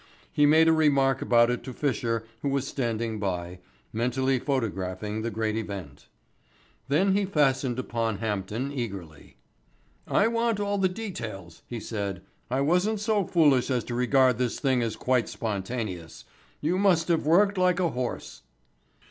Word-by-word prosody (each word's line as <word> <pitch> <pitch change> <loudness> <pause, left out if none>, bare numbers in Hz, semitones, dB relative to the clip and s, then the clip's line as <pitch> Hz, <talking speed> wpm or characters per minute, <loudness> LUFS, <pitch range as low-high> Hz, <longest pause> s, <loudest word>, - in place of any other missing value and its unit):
He 145 0 +4
made 160 +2 +6
a 160 - +6
remark 140 -4 +3
about 120 0 +4
it 125 - -3
to 130 - -7
Fisher 115 -4 -1 0.2
who 140 - -1
was 135 -1 0
standing 115 -4 -2
by, 90 -2 -3 0.3
mentally 125 +3 +1
photographing 105 -5 -2
the 115 - -2
great 110 0 -2
event. 100 -10 -6 0.8
Then 180 +8 +3
he 205 - +2
fastened 135 -8 +1
upon 115 -4 -2
Hampden 105 +5 -3
eagerly. 100 - -7 0.7
"I 205 - +3
want 230 -2 0
all 205 0 -1
the 190 -1 +3
details," 110 - -7
he 120 - -5
said. 100 -4 -4 0.3
"I 130 +2 0
wasn't 180 +8 +2
so 210 -2 +1
foolish 145 -8 +3
as 125 -3 0
to 120 - -6
regard 125 0 +3
this 125 -2 -1
thing 130 -4 +2
as 115 -2 -2
quite 125 -3 +1
spontaneous. 100 -5 -4 0.4
You 175 +5 0
must 180 -5 +3
have 165 -3 +1
worked 195 +4 +4
like 180 -1 +3
a 175 -2 +2
horse." 120 - -5
125 Hz, 155 wpm, -27 LUFS, 110-160 Hz, 0.8 s, made